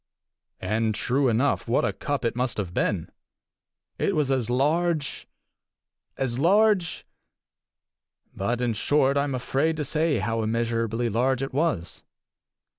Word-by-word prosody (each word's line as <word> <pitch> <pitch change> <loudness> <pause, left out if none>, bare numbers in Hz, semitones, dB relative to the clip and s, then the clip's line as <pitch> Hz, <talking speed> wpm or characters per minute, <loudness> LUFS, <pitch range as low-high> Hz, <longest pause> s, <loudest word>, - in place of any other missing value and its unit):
And, 110 0 0
true 130 +4 +1
enough, 120 +4 +1
what 115 - +2
a - - -1
cup 145 -3 -3
it 115 - 0
must 125 0 -1
have 95 -4 -3
been! - - -1 0.9
It 200 - +1
was 150 -3 +1
as 125 -4 0
large 150 +4 0 0.9
as 130 -2 -1
large 195 +1 +3 1.3
but, 120 +5 -1
in 120 -2 +1
short, 140 +4 +2
I 140 0 +2
am 140 -2 -2
afraid 140 +5 0
to 150 - -2
say 155 0 +1
how 115 +2 -1
immeasurably 115 +1 -1
large 125 +4 +1
it 135 - -5
was. 145 - -1
130 Hz, 135 wpm, -25 LUFS, 115-150 Hz, 1.3 s, large